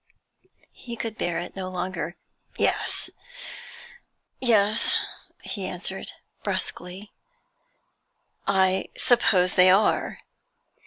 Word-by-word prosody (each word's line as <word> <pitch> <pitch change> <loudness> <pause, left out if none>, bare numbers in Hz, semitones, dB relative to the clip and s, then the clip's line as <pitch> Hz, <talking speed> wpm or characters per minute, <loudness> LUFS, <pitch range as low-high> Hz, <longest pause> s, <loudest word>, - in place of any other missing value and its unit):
He 240 -1 -8
could 225 -1 -4
bear 175 -5 -1
it 175 - -5
no 185 -1 -4
longer. 175 -2 -3 0.4
'Yes,' - - 0 1.3
he 220 -3 +1
answered, - - -4 0.3
brusquely, 185 +4 -4 1.4
'I 190 -1 +3
suppose 190 -7 +4
they 185 0 +7
are.' 195 +3 +3
190 Hz, 75 wpm, -26 LUFS, 180-215 Hz, 1.4 s, they